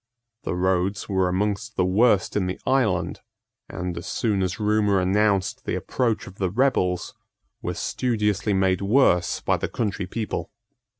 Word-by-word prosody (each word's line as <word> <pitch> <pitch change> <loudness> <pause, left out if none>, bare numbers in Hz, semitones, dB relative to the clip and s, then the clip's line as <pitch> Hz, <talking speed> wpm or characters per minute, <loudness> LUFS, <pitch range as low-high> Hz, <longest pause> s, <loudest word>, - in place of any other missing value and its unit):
The - - -1
roads 95 +2 0
were 95 -2 +1
amongst 105 +3 -1
the 90 - +2
worst 100 +2 +3
in 95 -3 +1
the 90 - -4
island, 110 -10 +1 0.5
and, 90 -1 -4
as 85 - -6
soon 105 -4 0
as 95 0 -2
rumour 105 -2 +2
announced 100 +1 +1
the - - -2
approach 120 -4 -1
of 95 - -13
the 95 -2 +1
rebels, 90 -6 +1 0.5
were - - -3
studiously 105 -4 0
made 95 0 +2
worse 100 -4 +3
by - - +1
the - - -3
country 100 -4 -2
people. 110 +1 -4
100 Hz, 155 wpm, -24 LUFS, 95-105 Hz, 0.5 s, worst